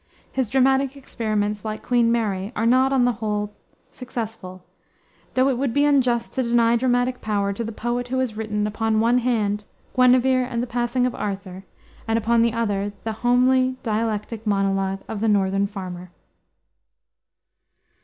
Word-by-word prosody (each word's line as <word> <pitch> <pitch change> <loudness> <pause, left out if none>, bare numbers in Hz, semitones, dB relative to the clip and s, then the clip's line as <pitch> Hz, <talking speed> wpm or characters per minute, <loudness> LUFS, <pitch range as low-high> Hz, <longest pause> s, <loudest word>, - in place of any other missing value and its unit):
His 260 -5 -1
dramatic 265 +1 +2
experiments, 215 -5 -2
like 215 -1 -5
Queen 240 -2 +2
Mary, 205 -4 -1
are 225 - 0
not, 260 +3 +4
on 260 -2 +3
the 245 - +3
whole, 210 -1 -2 0.4
successful, 220 -7 -7 0.7
though 260 +1 +4
it 260 -3 0
would 270 -3 -1
be 285 0 +4
unjust 250 -5 +2
to 260 - 0
deny 235 -1 +3
dramatic 245 +1 +1
power 200 -2 -1
to 230 - -4
the 225 - -4
poet 240 +2 -3
who 260 +1 -2
has 255 -4 -1
written, 210 -1 -2
upon 220 +1 0
one 235 +3 +3
hand, 210 -4 0 0.3
Guinevere 255 0 +4
and 235 -1 -2
the - - -1
Passing 245 +1 0
of 250 - -1
Arthur, 195 -2 -5 0.4
and 225 0 +1
upon 230 +1 +2
the 230 0 +3
other 205 -3 -1
the 225 - -2
homely, 255 +1 +3
dialectic 220 0 -2
monologue 195 -1 0
of 210 -2 -5
the 225 - +1
Northern 195 -1 +2
Farmer. 180 -3 -7
230 Hz, 160 wpm, -23 LUFS, 210-250 Hz, 0.7 s, not